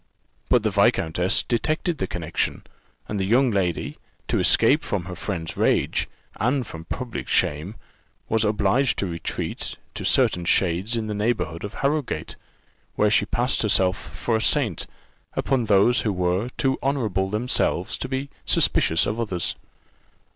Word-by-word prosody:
But 120 -3 +4
the 110 - +1
viscountess 95 -4 +2
detected 155 +7 -1
the 95 - -1
connexion, 85 -2 -2 0.4
and 105 - -3
the - - 0
young 120 +6 +3
lady, 90 -5 -1 0.3
to - - +1
escape - - +4
from 95 -4 -3
her 90 -1 -6
friend's 85 -3 -4
rage, - - +1 0.3
and 125 +4 +1
from 80 -4 -9
public 125 +6 -5
shame, 80 +9 0 0.5
was 110 0 +2
obliged 110 +5 +2
to - - -1
retreat 85 -3 -4 0.2
to - - -6
certain 90 - +3
shades 95 +6 +1
in 115 -1 -2
the 105 - -3
neighbourhood 105 -6 -1
of 100 +2 -6
Harrowgate; 145 0 -2 0.6
where 105 0 +3
she 105 -1 +3
passed 125 +2 0
herself 95 -4 +2
for 115 +2 -2
a - - -3
saint 115 - +1 0.5
upon 130 -4 0
those 105 +4 +4
who 105 - 0
were 90 +4 0
too 135 -1 +1
honourable 110 -9 0
themselves 110 +5 0
to - - -4
be 135 +1 -3 0.2
suspicious 80 - +3
of 110 +3 -2
others. 95 -7 -1
105 Hz, 150 wpm, -24 LUFS, 90-120 Hz, 0.6 s, But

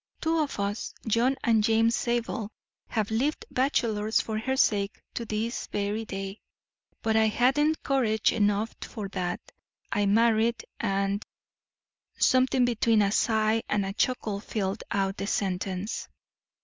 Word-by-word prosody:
Two 325 0 +1
of 295 -8 -2
us, 200 +2 -3
John 235 +5 +3
and 225 -3 +3
James 225 +1 +3
Zabel, 235 -3 -1 0.4
have 215 -2 -1
lived 270 +8 0
bachelors 225 -5 +1
for 215 -1 -2
her 265 +4 -1
sake 200 -5 +2
to 235 - -4
this 220 +2 -3
very 205 +2 -2
day; 195 0 -6 0.6
but 220 -1 +1
I 220 0 +5
hadn't 275 +8 +2
courage 230 -6 +2
enough 210 +1 +1
for 205 -4 -6
that; 180 -2 -2 0.5
I 205 0 +1
married 225 +2 +3
and" 195 +1 0 0.9
something 255 0 +4
between 230 -2 +3
a 200 - +1
sigh 220 0 +2
and 200 -2 +1
a 195 - -3
chuckle 215 -3 -1
filled 200 -1 -3
out 195 0 0
the 200 - -3
sentence. 190 +1 -2
220 Hz, 135 wpm, -27 LUFS, 200-235 Hz, 0.9 s, I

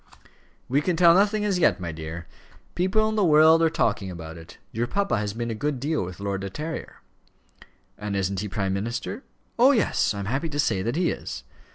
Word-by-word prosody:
"We 140 +4 +2
can 180 +2 0
tell 170 0 +6
nothing 205 +3 +2
as 195 -3 +1
yet, 165 - +3
my 85 -2 -4
dear. 80 +1 -7 0.5
People 190 +5 +2
in 220 - -2
the 210 - +2
world 160 0 +6
are 165 - +4
talking 105 -10 0
about 80 -2 -8
it. 80 -1 -12
Your 115 +2 -1
papa 200 - 0
has 105 0 -3
been 115 0 -3
a - - -1
good 140 +4 -2
deal 150 +1 -1
with 90 0 -8
Lord 100 -1 -3
De 95 - -4
Terrier." 155 - -6 1.0
"And 105 -1 -3
isn't 95 0 -1
he 105 - -3
prime 95 -1 -1
minister?" 115 - -4 0.4
"Oh, 260 +4 +7
yes; 215 - +1
I - - -4
am 100 - -4
happy 135 - -2
to 145 -1 -4
say 95 -9 +1
that 115 +7 -2
he 175 +1 +1
is." - - -6
120 Hz, 215 wpm, -25 LUFS, -, 1.0 s, Oh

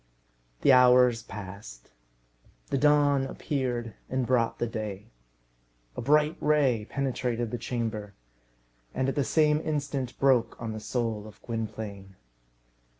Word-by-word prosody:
The - - +5
hours 125 -2 +6
passed. 95 - -10 0.8
The - - +2
dawn 145 -1 +4
appeared 125 -6 -3 0.2
and 130 -1 0
brought 120 -2 +1
the - - -1
day. 105 -3 -6 0.8
A - - -4
bright 150 +4 +3
ray 135 -8 +2
penetrated 125 -4 -2
the 120 - -3
chamber, 110 -4 -4 0.8
and 130 +1 +1
at - - -1
the 145 - +1
same 150 +1 +3
instant 140 -5 -3
broke 130 -4 +2
on 115 -1 -4
the 110 - -5
soul 110 -1 -3
of 105 -1 -14
Gwynplaine. 105 -4 -6
120 Hz, 125 wpm, -28 LUFS, 110-135 Hz, 0.8 s, hours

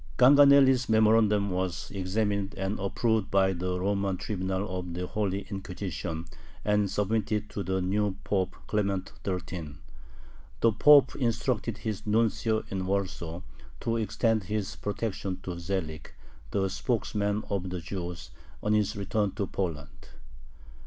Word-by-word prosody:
Ganganelli's 135 -1 +7
memorandum 110 -2 +4
was 90 -1 -2
examined 100 +1 -1
and 95 +2 -2
approved 105 +2 0
by 95 -1 +3
the 90 +1 -2
Roman 100 0 0
tribunal 95 -1 -2
of 90 -2 -6
the 90 +1 -2
"Holy 100 0 -1
Inquisition," 95 -4 -5 0.4
and 105 -1 +2
submitted 105 +1 -1
to 100 - -3
the 95 -1 -1
new 100 +1 0
Pope 95 -2 0
Clement 100 -3 -1
XIII. 90 -5 -4 0.9
The 115 - +5
Pope 140 +5 +6
instructed 115 -2 0
his 110 -1 -4
nuncio 110 0 +2
in 95 -1 -2
Warsaw 90 -3 -2 0.4
to 115 0 0
extend 110 -1 +1
his 105 +1 -2
protection 100 -3 -3
to 90 -2 -5
Zelig, 85 -4 -4 0.4
the 95 -1 +1
spokesman 105 +1 -1
of 95 -2 -1
the 90 0 -3
Jews, 90 0 -6 0.3
on 105 - +2
his 105 -2 +1
return 100 0 -1
to 100 -1 -1
Poland. 80 -8 -5
100 Hz, 130 wpm, -28 LUFS, 95-110 Hz, 0.9 s, Ganganelli's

